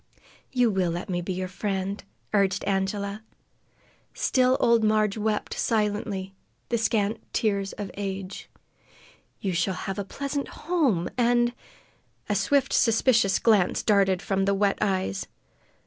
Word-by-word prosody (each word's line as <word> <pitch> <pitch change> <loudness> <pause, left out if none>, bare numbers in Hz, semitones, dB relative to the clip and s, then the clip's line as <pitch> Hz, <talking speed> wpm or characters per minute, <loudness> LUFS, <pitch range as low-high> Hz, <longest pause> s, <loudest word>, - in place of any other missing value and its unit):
"You 245 -3 +3
will 190 -3 +1
let 175 +3 -4
me 175 -1 -1
be 175 - -4
your 185 +1 -3
friend," 195 +1 -3 0.3
urged 195 -1 +2
Angela. 200 +1 -1 0.9
Still 255 0 +3
old 235 -1 +4
Marg 215 -1 +2
wept 215 -1 -1
silently, 205 -3 -1 0.4
the 235 - +1
scant 220 -1 +1
tears 200 -3 0
of 205 -2 -6
age. 195 -1 -5 0.9
"You 190 -2 -1
shall 175 +2 0
have 195 +2 -4
a - - -1
pleasant 280 +7 -4
home 280 - 0
and 240 0 +3 0.4
" - - -35
A - - +2
swift, 265 +8 +2
suspicious 225 -3 +3
glance 210 -6 +3
darted 195 -3 +3
from 195 -1 0
the 200 0 +2
wet 200 0 +1
eyes. 185 - -1
200 Hz, 135 wpm, -26 LUFS, 190-225 Hz, 0.9 s, old